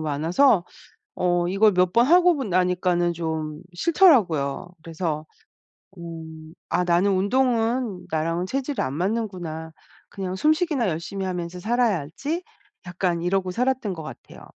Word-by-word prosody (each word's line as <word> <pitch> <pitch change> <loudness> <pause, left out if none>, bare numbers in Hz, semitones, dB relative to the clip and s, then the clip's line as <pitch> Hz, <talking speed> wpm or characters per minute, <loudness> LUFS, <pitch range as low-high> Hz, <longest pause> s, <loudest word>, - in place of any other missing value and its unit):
많아서 170 - +2 0.5
어 175 -1 +1
이걸 195 +3 +4
몇 180 0 +2
번 235 +1 +5
하고 350 +3 +5
보 270 - -3
나니까는 180 -2 +1
좀 160 -2 -4
싫더라고요. 185 - +3 0.2
그래서 160 -2 -3 0.7
'음 160 -2 -9 0.2
아 180 - +1
나는 180 +3 +2
운동은 230 +1 0
나랑은 165 +3 -1
체질이 275 +4 -2
안 130 - -2
맞는구나. 180 -5 -3 0.4
그냥 190 -2 -5
숨쉬기나 305 - +1
열심히 175 +4 -4
하면서 180 -1 -4
살아야지.' 235 - -1 0.4
약간 175 -1 -1
이러고 185 +1 0
살았던 250 -2 -1
것 160 - -8
같아요. 155 - -11
180 Hz, 290 characters per minute, -24 LUFS, 165-230 Hz, 0.7 s, 번